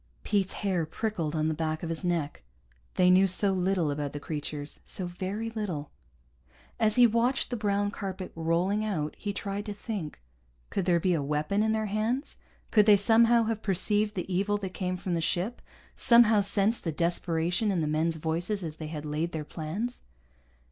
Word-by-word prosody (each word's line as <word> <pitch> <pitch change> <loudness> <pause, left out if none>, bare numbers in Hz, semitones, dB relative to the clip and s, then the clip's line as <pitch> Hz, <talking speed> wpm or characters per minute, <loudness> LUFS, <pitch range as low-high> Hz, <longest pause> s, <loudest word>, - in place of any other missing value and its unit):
Pete's 195 -2 0
hair 180 -5 0
prickled 170 -5 -3
on 155 0 +1
the 160 - +1
back 155 0 -2
of 165 - -3
his 165 +1 -1
neck. 170 -5 -1 0.5
They 180 0 +5
knew 190 +1 +6
so 195 +2 +2
little 180 -4 +1
about 145 -1 -3
the 145 - -4
creatures, 145 -1 -5
so 185 - -4
very 195 +6 -4
little. 185 -10 -4 0.9
As 215 -2 +3
he 245 -1 +7
watched 240 +4 +1
the - - 0
brown 205 -2 0
carpet 190 -2 -5
rolling 170 +6 0
out, 160 -8 -2
he 205 - -4
tried 200 0 -4
to 205 - -4
think. 200 -8 -5 0.5
Could 195 - -1
there 175 -2 +3
be 180 +2 +1
a 160 - 0
weapon 150 +8 0
in 220 0 +2
their 220 0 0
hands, 220 +7 -2 0.4
could 210 -1 +5
they 210 -1 +8
somehow 230 +3 +5
have 220 -1 -2
perceived 210 +2 +2
the 185 0 -3
evil 200 +3 +1
that 190 -2 -6
came 185 -1 -2
from 180 0 -3
the 165 - 0
ship, 180 +8 -1 0.3
somehow 230 -3 +6
sensed 200 +3 +1
the 165 - -1
desperation 170 +4 0
in 185 -4 +1
the - - 0
men's 160 +2 0
voices 170 +6 -1
as 155 -2 -6
they 155 - -6
had 155 -1 -6
laid 155 +3 -2
their 155 -2 -4
plans? 180 +12 -4
185 Hz, 190 wpm, -28 LUFS, 160-210 Hz, 0.9 s, they